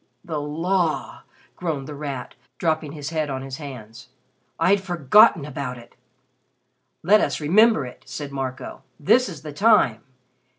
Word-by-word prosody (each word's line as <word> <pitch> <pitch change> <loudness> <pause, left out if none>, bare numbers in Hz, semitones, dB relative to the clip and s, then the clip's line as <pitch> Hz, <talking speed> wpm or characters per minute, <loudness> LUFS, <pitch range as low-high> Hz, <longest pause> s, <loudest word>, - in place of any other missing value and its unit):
"The 155 -3 -3
Law!" 165 +3 -1 0.3
groaned 155 -6 -4
The 150 - -7
Rat, 140 -3 -6 0.2
dropping 155 -3 -1
his 150 0 -6
head 155 -2 -1
on 135 -1 -4
his 135 -1 -7
hands, 125 -5 -10 0.5
"I'd 190 +4 +3
forgotten 175 - +4
about 140 -3 -5
it." 120 - -15 1.1
"Let 210 +6 +5
us - - -1
remember 190 - +4
it," 125 - -11
said 145 -2 -6
Marco. 130 -2 -5 0.2
"This 245 - +3
is 160 -4 -10
the 150 -2 -7
time. 170 - +3
150 Hz, 140 wpm, -23 LUFS, 135-175 Hz, 1.1 s, Let